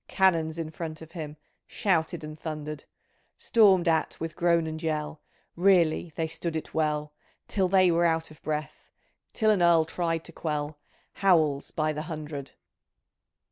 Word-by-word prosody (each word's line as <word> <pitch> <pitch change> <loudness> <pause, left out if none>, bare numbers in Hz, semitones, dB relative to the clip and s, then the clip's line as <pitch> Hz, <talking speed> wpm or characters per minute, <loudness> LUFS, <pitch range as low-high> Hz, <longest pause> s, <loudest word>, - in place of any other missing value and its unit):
Canons 165 -4 +2
in 160 -2 -4
front 160 -1 -6
of 160 - -14
him. 155 -3 -7 0.3
Shouted 170 -5 0
and 155 0 -7
thundered! 150 -1 -6 0.5
Stormed 195 -6 +4
at 160 -1 +1
with 165 0 -5
groan 170 -1 +2
and 160 0 -5
yell, 155 -1 -3 0.3
Really 175 -3 +3
they 165 - -1
stood 160 +1 -4
it 160 - -5
well, 150 -1 -1 0.3
Till 190 -2 +1
they 185 -1 +4
were 170 +1 +3
out 160 -1 0
of 155 - -16
breath. 150 0 -4 0.4
Till 215 -2 +2
an 200 -4 +2
Earl 170 -2 +5
tried 165 0 -2
to - - -10
quell 150 -2 -3 0.4
Howls 155 -7 +3
by 155 -1 -1
the 150 - -4
hundred 155 -3 -6
160 Hz, 155 wpm, -27 LUFS, 155-170 Hz, 0.5 s, Earl